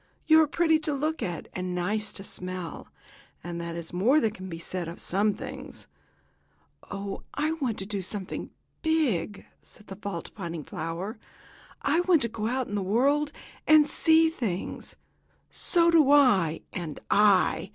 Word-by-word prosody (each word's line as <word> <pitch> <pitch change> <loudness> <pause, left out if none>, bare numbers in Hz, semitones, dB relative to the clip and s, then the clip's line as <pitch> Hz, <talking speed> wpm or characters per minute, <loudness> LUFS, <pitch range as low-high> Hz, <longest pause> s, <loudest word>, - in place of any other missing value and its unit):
You 315 0 +7
are 310 - +3
pretty 320 +1 +3
to 305 -1 -2
look 310 +3 -2
at, 175 -3 -4
and 180 -1 -3
nice 210 +5 -1
to 195 - -8
smell, 185 -3 -6 0.6
and 170 0 -5
that 170 0 -5
is 170 0 -6
more 235 +12 +4
than 225 -7 +1
can 190 -2 -9
be 165 - -5
said 175 +1 -4
of 170 - -8
some 200 +2 +1
things." - - -8 1.0
"Oh, 195 0 -5
I 305 +2 0
want 270 -9 -2
to 190 - -4
do 200 -1 -3
something 190 +1 -4 0.3
big!" 245 - 0 0.2
said 210 - -16
the 195 - -8
fault 195 -3 -6
finding 170 -5 -5
violet. 165 - -5 0.7
"I 295 +4 +2
want 355 -5 +4
to 235 - 0
go 220 -1 -3
out 255 +1 -1
in - - -7
the 205 - 0
world 275 +9 +2 0.4
and 310 -1 +7
see 325 +1 +4
things." 210 - -4 0.6
"So 340 -1 +2
do 310 -5 +5
I! 200 - +4
And 165 -5 -5
I! 205 -2 +4
210 Hz, 165 wpm, -27 LUFS, 180-295 Hz, 1.0 s, You